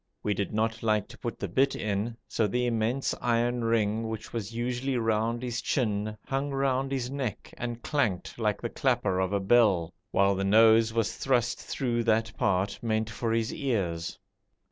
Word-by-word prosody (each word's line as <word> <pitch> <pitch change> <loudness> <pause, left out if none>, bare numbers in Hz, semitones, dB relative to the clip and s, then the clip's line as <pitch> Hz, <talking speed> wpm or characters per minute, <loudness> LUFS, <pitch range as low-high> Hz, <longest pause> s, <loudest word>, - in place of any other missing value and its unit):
We 105 - +1
did 100 -1 -2
not 110 +1 -1
like 105 -3 +1
to - - -12
put - - -4
the - - -2
bit 135 +1 +2
in, 110 +2 -2
so 110 - +1
the 125 +4 0
immense 120 +3 0
iron 120 0 +1
ring 115 -1 +1
which 110 -1 -6
was 110 -3 -3
usually 125 +3 -1
round 115 +1 0
his 120 -1 -2
chin 105 -4 -1
hung 135 +1 -1
round 135 -1 0
his 130 -2 -2
neck 130 -8 -4
and 120 -1 -5
clanked 115 - -1
like 105 -2 0
the 115 - -1
clapper 120 -9 +1
of 95 0 0
a 100 - +1
bell, 95 -5 +3 0.2
while 100 0 +3
the 95 0 -1
nose 110 +2 +6
was 115 -1 0
thrust 120 -3 +1
through 120 -3 -1
that 110 -1 +1
part 95 +1 0
meant 110 -1 -1
for 115 +1 -2
his 115 -1 0
ears. 95 - -2
115 Hz, 180 wpm, -28 LUFS, 105-120 Hz, 0.2 s, nose